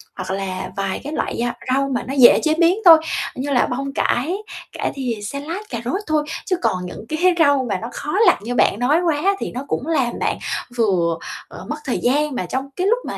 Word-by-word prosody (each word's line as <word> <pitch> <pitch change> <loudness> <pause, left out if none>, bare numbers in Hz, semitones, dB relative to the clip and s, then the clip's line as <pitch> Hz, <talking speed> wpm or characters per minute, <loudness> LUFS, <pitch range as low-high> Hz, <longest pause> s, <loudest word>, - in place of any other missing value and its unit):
hoặc - - -5
là 190 -1 -4
vài 195 -1 -2
cái 295 +2 -5
loại - - -2
gia 240 +1 -1 0.2
rau 275 +1 +1
mà 245 - -1
nó 270 - -3
dễ 255 -3 +7
chế 310 -1 +3
biến 335 +2 +4
thôi, 330 -2 +11 0.4
như 275 +3 -3
là 250 - +3
bông 275 +2 -3
cải, 290 +7 0 0.4
cải - - -3
thìa, 255 -4 -2
salad, 280 - -4
cà 235 - -4
rốt 370 +11 -1
thôi. 310 -1 +1 0.2
Chứ 370 - +1
còn 180 0 0
những 205 - -8
cái 310 - -2 0.2
rau 285 -4 +4
mà 195 - 0
nó 230 - -4
khó 295 - -5 0.2
lặt - - +6
như 245 +3 -3
bạn 215 - +3
nói 285 +7 +3
quá 345 +3 +1
thì - - -4
nó 255 +3 -5
cũng 275 - -2
làm 265 -7 0
bạn - - 0 0.4
vừa, 180 -8 +1 0.3
ờ, - - -10
mất 300 - -1
thời 255 - -1
gian 285 +2 +1
mà 185 - -2
trong 265 +7 -3
cái 370 +2 0
lúc 475 +3 +3
mà - - -4
270 Hz, 230 wpm, -20 LUFS, 235-310 Hz, 0.4 s, thôi